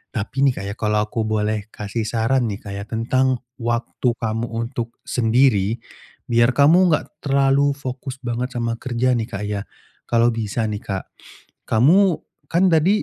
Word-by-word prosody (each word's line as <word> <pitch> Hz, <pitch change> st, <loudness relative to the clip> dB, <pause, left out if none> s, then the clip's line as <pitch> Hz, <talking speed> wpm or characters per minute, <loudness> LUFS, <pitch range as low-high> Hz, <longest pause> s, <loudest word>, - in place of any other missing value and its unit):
Tapi 130 Hz, +6 st, +1 dB
nih, 135 Hz, -, +3 dB
Kak 95 Hz, -, -5 dB
ya, -, -, -7 dB
kalau 105 Hz, -1 st, +1 dB
aku 110 Hz, +1 st, -2 dB
boleh 105 Hz, -1 st, -1 dB
kasih 105 Hz, +2 st, -3 dB
saran 120 Hz, +3 st, +1 dB
nih, 100 Hz, -2 st, -4 dB
Kak, 100 Hz, -, -7 dB
ya 100 Hz, 0 st, -5 dB
tentang 130 Hz, +3 st, 0 dB, 0.2 s
waktu 120 Hz, +1 st, -1 dB
kamu 115 Hz, 0 st, -2 dB
untuk 115 Hz, 0 st, -4 dB
sendiri. 115 Hz, -3 st, +2 dB, 0.5 s
Biar 120 Hz, +1 st, +2 dB
kamu 165 Hz, +6 st, +6 dB
enggak 155 Hz, -3 st, 0 dB
terlalu 140 Hz, 0 st, +2 dB
fokus 130 Hz, -1 st, -6 dB
banget 125 Hz, +1 st, -3 dB
sama 115 Hz, -1 st, -2 dB
kerja 130 Hz, 0 st, 0 dB
nih, 115 Hz, -3 st, 0 dB
Kak, 105 Hz, -3 st, -5 dB
ya. 105 Hz, -1 st, -2 dB, 0.5 s
Kalau 120 Hz, 0 st, +3 dB
bisa 115 Hz, 0 st, -2 dB
nih, 105 Hz, -, -3 dB
Kak, 95 Hz, -1 st, -4 dB, 0.7 s
kamu 170 Hz, -, +5 dB, 0.3 s
kan 180 Hz, +2 st, +3 dB
tadi 175 Hz, +6 st, +3 dB
120 Hz, 160 wpm, -21 LUFS, 110-135 Hz, 0.7 s, kamu